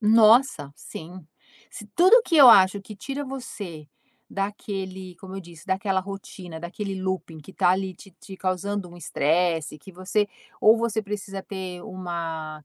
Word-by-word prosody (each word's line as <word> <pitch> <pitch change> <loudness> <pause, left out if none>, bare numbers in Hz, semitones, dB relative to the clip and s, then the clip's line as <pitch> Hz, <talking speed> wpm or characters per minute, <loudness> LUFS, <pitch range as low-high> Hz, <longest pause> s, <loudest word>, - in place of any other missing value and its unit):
Nossa, 220 - +5
sim. 170 +3 -10 0.5
Se 210 - -10
tudo 415 +8 +7
que 330 - +1
eu 270 -4 +10
acho 195 -2 +7
que 210 +2 -10
tira 275 +7 -5
você 205 - -7 0.4
daquele 190 -2 -5
como 190 0 -9
eu - - -5
disse, 170 -3 -14
daquela 190 0 0
rotina, 185 -3 -8
daquele 195 +4 -5
looping 185 -4 -3
que 155 +5 -13
tá - - +2
ali 190 0 0
te 195 +2 -15
te 195 -2 -10
causando 190 +1 -2
um 175 - -13
estresse, 165 0 0
que 190 - -13
você 185 +3 0 0.3
ou 220 +2 +7
você 225 -1 0
precisa 200 -2 -5
ter 185 -2 -6
uma 165 -4 -5
190 Hz, 155 wpm, -25 LUFS, 175-210 Hz, 0.5 s, eu